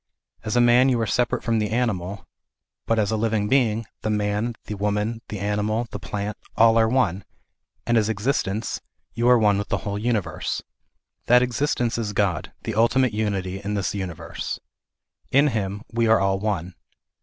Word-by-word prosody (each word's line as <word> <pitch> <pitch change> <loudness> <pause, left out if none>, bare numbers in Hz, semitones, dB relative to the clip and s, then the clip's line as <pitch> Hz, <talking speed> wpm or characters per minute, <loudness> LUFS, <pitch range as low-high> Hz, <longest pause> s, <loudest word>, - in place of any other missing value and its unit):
As 110 - -2
a 120 - +5
man 120 +2 +5
you 125 -2 +2
ar& 115 - +1
separate 120 +2 0
from 115 -2 +1
the 105 -1 -1
animal, 100 -6 -2 0.6
but 115 - +2
as 105 -1 +1
a - - +1
living 110 -1 0
being, 115 -3 +2 0.2
the 110 - -2
man, 105 +2 0
the 105 - -5
woman, 105 +3 -1
the 105 - -4
animal, 105 +3 -1
the 105 - -5
plant, 105 -1 -4 0.2
are 115 0 +6
all 110 - +3
one, 105 -7 +1 0.6
and 120 -1 +3
as 105 0 0
existence, 110 -1 -1 0.3
you 120 +1 +2
are 125 - +7
one 105 -3 +3
with 100 - -3
the - - -2
whole 100 0 -2
universe. 105 -8 -2 0.6
That 125 +1 +6
existence 125 -2 0
is 105 -3 -3
God, 95 -6 0
the - - -3
ultimate 120 +2 +3
Unity 100 -3 -2
in 105 +1 -2
this 100 -1 -1
universe. 95 -5 -5 0.7
In 140 +3 +4
Him 105 -3 -3
we 115 0 +2
are 110 0 +5
all 95 0 +1
one. 95 -4 -2
110 Hz, 180 wpm, -24 LUFS, 100-115 Hz, 0.7 s, are